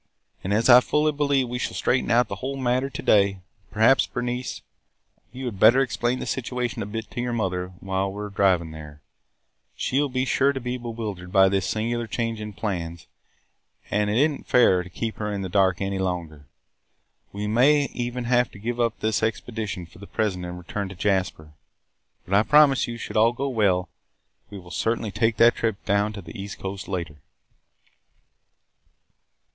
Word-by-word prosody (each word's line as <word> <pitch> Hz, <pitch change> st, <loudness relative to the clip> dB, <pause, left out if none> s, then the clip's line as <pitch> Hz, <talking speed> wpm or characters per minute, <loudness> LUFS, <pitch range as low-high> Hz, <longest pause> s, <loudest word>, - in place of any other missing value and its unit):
And, 95 Hz, -, -3 dB
as 110 Hz, +3 st, +2 dB
I 125 Hz, -1 st, +10 dB
fully 150 Hz, +4 st, +1 dB
believe 140 Hz, -3 st, +1 dB
we 125 Hz, +1 st, -4 dB
shall -, -, -3 dB
straighten 130 Hz, -, 0 dB
out 120 Hz, 0 st, +4 dB
the -, -, -5 dB
whole 135 Hz, +1 st, -4 dB
matter 130 Hz, +1 st, 0 dB
to -, -, -6 dB
day, 100 Hz, -2 st, +3 dB, 0.3 s
perhaps, 110 Hz, +5 st, +4 dB
Bernice, 125 Hz, +1 st, -4 dB, 0.7 s
you 130 Hz, +2 st, -7 dB
had 110 Hz, -6 st, -5 dB
better 115 Hz, +6 st, +7 dB
explain 125 Hz, -1 st, -1 dB
the -, -, -5 dB
situation 125 Hz, -1 st, -3 dB
a 100 Hz, -, -4 dB
bit 110 Hz, +1 st, -6 dB
to 120 Hz, -, -3 dB
your 120 Hz, 0 st, -2 dB
mother 95 Hz, -5 st, -1 dB
while 95 Hz, 0 st, -1 dB
we 105 Hz, +1 st, -6 dB
are 105 Hz, -, -5 dB
driving 95 Hz, -5 st, +2 dB
there. 75 Hz, -2 st, -11 dB, 0.7 s
She 135 Hz, +3 st, 0 dB
will 145 Hz, -, 0 dB
be 130 Hz, 0 st, -1 dB
sure 140 Hz, +1 st, +2 dB
to 135 Hz, -, -4 dB
be 125 Hz, 0 st, -3 dB
bewildered 110 Hz, -6 st, -6 dB
by 95 Hz, 0 st, +5 dB
this 95 Hz, -1 st, 0 dB
singular 115 Hz, +2 st, -2 dB
change 115 Hz, 0 st, -3 dB
in 105 Hz, -1 st, -6 dB
plans 85 Hz, -5 st, -4 dB, 0.9 s
and 105 Hz, 0 st, +1 dB
it 105 Hz, -, +1 dB
is 145 Hz, +4 st, +5 dB
n't 150 Hz, -3 st, -7 dB
fair 95 Hz, -7 st, +4 dB
to 90 Hz, -, -10 dB
keep 110 Hz, +5 st, -4 dB
her 105 Hz, -1 st, -3 dB
in 100 Hz, -1 st, -3 dB
the 95 Hz, -, -4 dB
dark 95 Hz, -1 st, +2 dB
any 95 Hz, 0 st, -2 dB
longer. 85 Hz, -6 st, -4 dB, 0.8 s
We 100 Hz, +1 st, -4 dB
may 130 Hz, +7 st, +4 dB
even 120 Hz, 0 st, -3 dB
have 120 Hz, 0 st, +2 dB
to -, -, -11 dB
give 120 Hz, +4 st, -4 dB
up 115 Hz, -2 st, 0 dB
this 110 Hz, 0 st, 0 dB
expedition 110 Hz, -4 st, -3 dB
for 100 Hz, -, -18 dB
the 100 Hz, -, -11 dB
present 95 Hz, -5 st, -2 dB
and 90 Hz, 0 st, -6 dB
return 95 Hz, +3 st, -5 dB
to 95 Hz, -, -9 dB
Jasper. 90 Hz, -5 st, -1 dB, 0.7 s
But, 95 Hz, -, -5 dB
I 100 Hz, -, +6 dB
promise 145 Hz, +2 st, +5 dB
you, 120 Hz, 0 st, -5 dB
should 115 Hz, -, -5 dB
all 115 Hz, +2 st, +4 dB
go 135 Hz, +3 st, -2 dB
well, 100 Hz, -7 st, +1 dB, 0.6 s
we 100 Hz, -, -8 dB
will 90 Hz, -2 st, -12 dB
certainly 115 Hz, -1 st, -1 dB
take 115 Hz, +1 st, +1 dB
that 120 Hz, +1 st, +6 dB
trip 110 Hz, -3 st, -3 dB
down 100 Hz, +2 st, +1 dB
the 95 Hz, -2 st, -8 dB
east 100 Hz, +1 st, -7 dB
coast 95 Hz, 0 st, -6 dB
later." 85 Hz, -6 st, -4 dB
110 Hz, 190 wpm, -24 LUFS, 95-120 Hz, 0.9 s, I